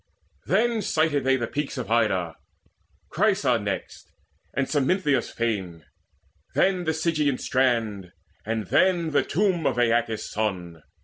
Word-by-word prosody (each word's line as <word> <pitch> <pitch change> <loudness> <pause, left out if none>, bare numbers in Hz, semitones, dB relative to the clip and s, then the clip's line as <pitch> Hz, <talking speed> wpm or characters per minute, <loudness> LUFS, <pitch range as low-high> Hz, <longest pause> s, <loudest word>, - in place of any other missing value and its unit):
Then 230 0 +2
sighted 155 -6 +1
they 135 0 +3
the 120 - -2
peaks 145 +4 -4
Of 125 -3 -5
Ida, 95 -7 +1 0.8
Chrysa - - +2
next, - - -5 0.4
and 140 -1 -1
Smintheus' 145 -2 +1
fane, 95 -9 -3 0.7
Then 185 -2 +2
the 160 - +1
Sigean 155 -4 0
strand, 115 -8 0 0.3
and 110 -1 -2
then 175 - +2
the 145 -1 +3
tomb 180 +1 0
Of - - -1
Aeacus' 115 -2 +1
son. 90 -6 -3
130 Hz, 125 wpm, -25 LUFS, 110-160 Hz, 0.8 s, they